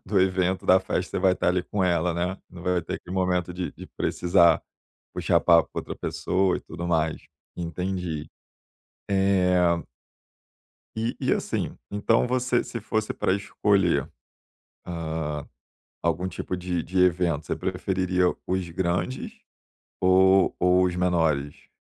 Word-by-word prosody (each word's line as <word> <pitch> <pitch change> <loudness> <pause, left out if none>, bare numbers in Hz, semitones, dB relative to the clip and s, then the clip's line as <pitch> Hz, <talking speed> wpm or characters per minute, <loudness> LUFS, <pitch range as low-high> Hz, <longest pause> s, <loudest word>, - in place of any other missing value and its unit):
do 100 -1 +2
evento, 95 0 +1
da 95 0 +6
festa, 95 0 -3
você - - -2
vai 95 0 +4
estar 90 - 0
ali 90 0 +1
com 100 - -2
ela, 90 -1 +1
né, 90 +3 -2
não 90 -1 -11
vai 90 -1 +1
ter 80 - -4
aquele 90 - -7
momento 90 -1 0
de 90 0 -4
de - - -11
precisar 85 -1 +3 0.5
puxar - - +2
papo 85 -2 +5
com - - -2
outra - - -7
pessoa 95 0 0
e - - -7
tudo 85 +2 -7
mais. 80 -2 0 0.4
Entendi. 90 -2 -3 0.8
Eh 95 -2 +3 1.4
E 115 +2 -2
e, - - 0
assim, - - -3
então 105 +4 +2
você, 125 0 +1
se 115 - -6
fosse 110 0 -1
pra - - +1
escolher, 100 -2 +1 0.8
hã, 80 -3 -4 0.6
algum 85 +2 0
tipo 95 0 -4
de 90 -1 -2
de 95 +2 -2
evento, 85 -4 +2
você - - -2
preferiria 90 -1 0 0.2
os 95 -1 -1
grandes 90 +8 -2 0.6
ou 95 +1 +4
ou 90 +1 +4
os 90 - -1
menores? 80 -5 0
90 Hz, 145 wpm, -25 LUFS, 85-95 Hz, 1.4 s, da